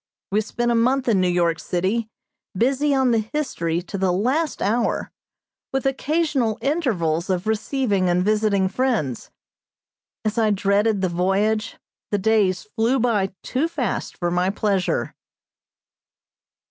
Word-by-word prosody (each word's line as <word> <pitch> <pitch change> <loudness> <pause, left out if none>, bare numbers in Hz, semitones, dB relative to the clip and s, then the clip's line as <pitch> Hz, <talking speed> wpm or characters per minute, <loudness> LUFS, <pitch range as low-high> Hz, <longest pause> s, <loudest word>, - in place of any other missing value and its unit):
We 210 +2 +2
spent 240 +2 -1
a - - +3
month 255 +3 +2
in 205 -5 +3
New 185 - +2
York 170 -1 +1
city, 200 +6 -1 0.5
busy 275 +5 +2
on 260 -2 +3
the 230 - +3
History 175 - -2
to 195 +2 -6
the 190 -1 +2
last 260 - 0
hour, 230 +4 0 0.6
with 270 0 -2
occasional 270 -4 0
intervals 205 - 0
of 185 0 0
receiving 220 -3 0
and 180 +1 +2
visiting 210 -2 +2
friends. 205 - -1 1.0
As 215 +1 0
I 220 -1 +3
dreaded 205 +1 +2
the 185 - +1
voyage, 195 +5 0 0.3
the 205 - +1
days 200 -3 +2
flew 235 +4 +2
by 215 -5 +1
too 275 +6 0
fast 285 - -3
for 175 -1 -1
my 180 +1 +1
pleasure. 200 -2 0
215 Hz, 135 wpm, -22 LUFS, 185-250 Hz, 1.0 s, a